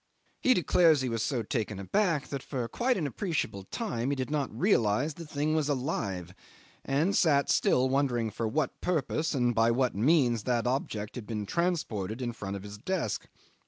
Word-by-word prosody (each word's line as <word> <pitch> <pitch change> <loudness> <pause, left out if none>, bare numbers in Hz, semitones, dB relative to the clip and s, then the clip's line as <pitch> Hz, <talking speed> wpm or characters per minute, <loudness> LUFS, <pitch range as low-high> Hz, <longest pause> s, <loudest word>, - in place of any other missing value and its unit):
He 255 -1 +5
declares 165 -4 +4
he 130 - -1
was 115 -1 -1
so 120 -1 -1
taken 110 -2 -2
aback 160 - 0
that 140 -2 -4
for 125 -4 -3
quite 250 - 0
an 165 - -1
appreciable 140 - -2
time 135 - -3
he 140 - +1
did 130 +1 -3
not 145 -3 0
realise 135 - +2
the 165 +1 -9
thing 150 +1 -1
was 155 -2 +1
alive, 100 - -2 0.5
and 155 +9 +1
sat 145 -5 +3
still 130 +1 +3
wondering 130 -5 +1
for 110 +2 -2
what 140 +4 -1
purpose 160 -2 0
and 120 -2 +2
by 115 0 +3
what 125 +1 +1
means 120 - +2
that 120 -2 +1
object 115 -5 -2
had 120 -5 -7
been 105 -3 -3
transported 120 - -1
in 120 -2 -3
front 100 -3 -5
of 100 - -6
his 105 0 -9
desk. 165 - -2
130 Hz, 185 wpm, -29 LUFS, 115-155 Hz, 0.5 s, He